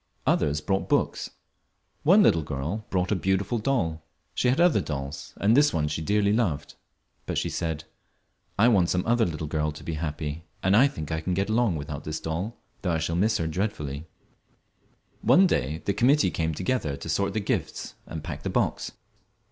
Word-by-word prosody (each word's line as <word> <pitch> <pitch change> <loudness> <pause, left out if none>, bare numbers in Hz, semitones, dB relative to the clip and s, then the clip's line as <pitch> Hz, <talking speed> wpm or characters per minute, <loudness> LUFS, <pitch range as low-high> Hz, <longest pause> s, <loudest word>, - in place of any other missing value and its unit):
Others 75 0 +2
brought 95 +2 -1
books. - - +1 0.7
One 190 +8 +6
little 85 - +4
girl 75 +8 -4
brought 90 0 0
a - - +3
beautiful 95 +5 0
doll. 85 -11 0 0.3
She - - +1
had 130 +5 +2
other 175 -1 +5
dolls, 70 -1 -5
and 105 +4 +3
this 145 +2 +5
one 75 -2 +1
she 75 +2 -3
dearly 100 +4 +2
loved, 85 -11 0 0.5
but - - -2
she - - -1
said, 80 -2 -2 0.7
"I 110 - +5
want 95 -8 +4
some 90 0 0
other 120 0 +3
little 80 -2 -4
girl 75 0 -1
to 75 - -11
be 80 - -4
happy, 75 0 -4 0.2
and 95 +1 +4
I 130 +6 +7
think 80 - -6
I 80 0 -1
can 90 +2 -1
get 100 +3 0
along 110 -5 +2
without 75 0 -5
this 80 0 -4
doll, 90 +8 -4 0.2
though 90 -3 0
I - - +2
shall 80 +1 -1
miss 110 +5 +2
her 85 - -1
dreadfully." 80 -4 -3 1.1
One 190 - +6
day 75 - 0
the 100 - +1
committee 130 +9 +3
came 80 -2 -1
together 90 - -1
to 70 - -8
sort 100 0 0
the 110 - 0
gifts 100 - -2
and - - -6
pack - - -6
the - - -3
box. - - -1
90 Hz, 190 wpm, -26 LUFS, 75-110 Hz, 1.1 s, I